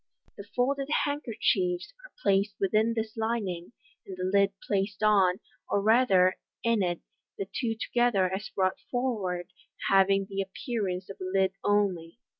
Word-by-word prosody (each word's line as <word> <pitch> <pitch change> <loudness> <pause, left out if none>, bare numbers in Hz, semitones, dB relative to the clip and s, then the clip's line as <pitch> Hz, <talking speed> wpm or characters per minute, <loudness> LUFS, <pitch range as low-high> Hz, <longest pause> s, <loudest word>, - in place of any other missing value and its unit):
The 200 - -10
folded 275 +3 0 0.2
handkerchiefs 225 - -1
are - - -13
placed 200 +1 +2
within 215 +4 +2
this 220 -1 -3
lining, 220 -5 -2 0.3
and 190 - -9
the 185 - -4
lid 200 +1 +3
placed 205 +1 -1
on, 195 -3 +4 0.3
or 205 - +2
rather 200 -4 +4 0.3
in 230 -2 +2
it 175 -2 -1 0.2
— - - -58
the 195 - -3
two 225 +3 -2
together 240 -3 +2
as 205 +2 -4
brought 185 -1 0
forward 210 -9 -2 0.4
having 195 0 +4
the 195 0 -3
appearance 195 -2 -3
of - - -11
a - - -3
lid 190 0 +1
only. 195 -4 +1
200 Hz, 150 wpm, -28 LUFS, 185-225 Hz, 0.4 s, on